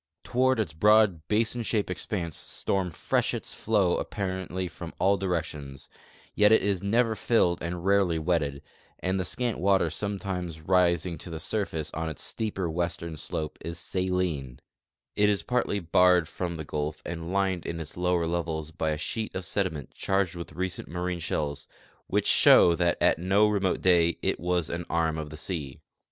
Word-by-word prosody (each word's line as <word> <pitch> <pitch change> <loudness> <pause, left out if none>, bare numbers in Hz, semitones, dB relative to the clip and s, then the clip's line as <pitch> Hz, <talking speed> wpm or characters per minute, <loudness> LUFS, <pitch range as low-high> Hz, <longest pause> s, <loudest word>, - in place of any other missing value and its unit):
Toward 130 0 +2
its 95 -8 -1
broad 105 -2 +4
basin 115 +3 +1
shape 110 -2 0
ex 90 - -4
panse 85 -8 -2
storm 95 -2 -2
freshets 80 - -1
flow 100 -5 +1
apparently 95 -2 -3
from 85 0 -9
all 100 +1 +3
directions, 80 -7 -4 0.4
yet 105 0 +5
it 110 - +5
is 100 -3 0
never 115 +3 +2
filled 105 -5 +2
and 85 +1 -4
rarely 95 -4 +3
wetted, 75 -4 -1 0.3
and 95 +1 -1
the 90 - -1
scant 120 +3 -2
water 95 -3 +3
sometimes 95 -3 -3
rising 85 -1 +2
to 90 - -9
the 80 -1 -5
surface 80 -4 -2
on 80 +1 -2
its 80 - -6
steeper 105 -5 -2
western 85 0 -3
slope 75 +1 -4
is 85 +1 -5
saline; 90 -8 -2 0.6
it 105 0 +4
is 100 -5 0
partly 125 -3 0
barred 90 -1 +4
from 85 +1 -4
the 80 -1 -6
gulf 75 +1 -3
and 85 0 -5
lined 95 -3 0
in 85 - -4
its 80 -1 -8
lower 90 -1 +1
levels 80 -2 -2
by 80 0 -2
a 75 - -1
sheet 110 +9 -3
of 95 -1 -4
sediment 90 -8 -2
charged 95 -3 0
with 85 -1 -7
recent 95 0 -3
marine 90 +1 -3
shells, 75 -4 -3 0.4
which - - 0
show 85 - +7
that 85 0 +1
at - - +3
no 100 +4 +4
remote 100 -3 0
day 85 -2 +4
it - - 0
was 90 -1 0
an 85 +1 -4
arm 80 -1 0
of 75 -1 -5
the 75 - -9
sea. 75 -5 -4
90 Hz, 170 wpm, -27 LUFS, 80-100 Hz, 0.6 s, show